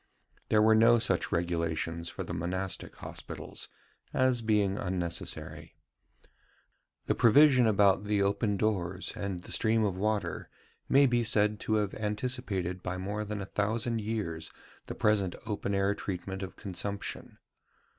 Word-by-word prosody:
There 105 -1 +4
were 110 0 +6
no 115 +2 +6
such 110 - +1
regulations 85 -1 -1
for - - -5
the - - -6
monastic 90 +3 -3
hospitals, - - -8 0.4
as 130 -2 +2
being 105 -3 +2
unnecessary. 90 -3 -4 1.3
The - - +2
provision 130 0 +6
about 100 -1 +4
the 105 0 +1
open 100 +1 +1
doors 95 -3 -1
and 95 -3 -4
the - - -10
stream 110 0 +3
of 100 -3 -1
water 105 +2 -2 0.4
may 140 +1 +6
be 120 -2 +2
said 105 -2 +2
to 110 - 0
have 105 -2 0
anticipated 105 -4 -2
by 90 0 -4
more 100 +3 -3
than 105 -1 -4
a - - -4
thousand 110 +2 0
years 100 -7 -3 0.4
the - - -5
present 100 -4 +1
open 100 -2 -2
air 100 +1 +2
treatment 95 -1 -5
of 95 - -6
consumption. 100 +1 -5
100 Hz, 140 wpm, -30 LUFS, 95-110 Hz, 1.3 s, were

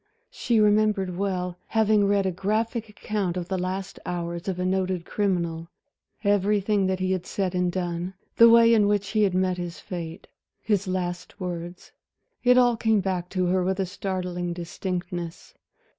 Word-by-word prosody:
She 235 -3 +1
remembered 210 -3 +3
well 180 -2 -2
having 215 -2 +3
read 200 -1 +2
a 190 - +1
graphic 220 +5 -1
account 205 -3 -3
of 175 -1 -3
the 190 - 0
last 185 +1 -4
hours 170 0 -4
of 190 -2 -1
a 180 - -1
noted 185 -2 0
criminal, 170 -5 -1 0.6
everything 205 0 +2
that 190 0 -1
he 185 0 0
had 185 -1 -2
said 190 -2 -2
and 180 -1 +1
done, 175 0 -3 0.2
the 230 0 +9
way 230 0 +7
in 210 -3 +4
which 205 -1 +1
he 215 +2 +1
had 195 -3 +2
met 185 -1 +1
his 175 -1 -5
fate, 170 -1 -7 0.3
his 205 -2 0
last 180 +1 -3
words... 175 -1 -6 0.5
it 250 0 +5
all 245 -1 +5
came 220 -1 +2
back 180 -2 -2
to 185 -1 0
her 180 +1 +2
with 190 +1 0
startling 180 -2 -3
distinctness. 175 0 -5
185 Hz, 165 wpm, -25 LUFS, 180-205 Hz, 0.6 s, the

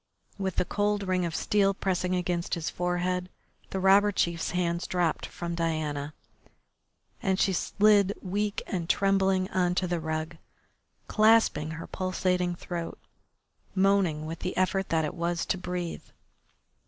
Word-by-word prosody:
With 190 -2 -2
the - - +1
cold 205 +1 0
ring 185 -2 0
of 165 -1 -3
steel 195 -1 +2
pressing 185 -1 0
against 175 -1 -1
his 165 -1 -3
forehead 180 +1 -1 0.4
the 190 - -3
robber 195 +2 +5
chief's 170 -4 0
hands 170 -1 -1
dropped 175 -3 0
from 170 0 -5
Diana, 155 -3 -2 1.1
and 190 0 +1
she 195 - +3
slid 205 +2 +3
weak 205 +2 -2
and 175 -3 -3
trembling 195 -1 +2
on 180 -1 +1
to 185 - +1
the 175 -1 -1
rug, 160 +1 -3 0.7
clasping 215 -8 +4
her 165 - -6
pulsating 180 -1 -1
throat, 170 -1 -5 0.8
moaning 190 -5 +2
with 165 +1 -5
the 185 - -4
effort 190 +1 +1
that 160 -1 +2
it 150 - -4
was 170 0 -1
to - - 0
breathe. 180 -2 -4
180 Hz, 140 wpm, -28 LUFS, 170-195 Hz, 1.1 s, robber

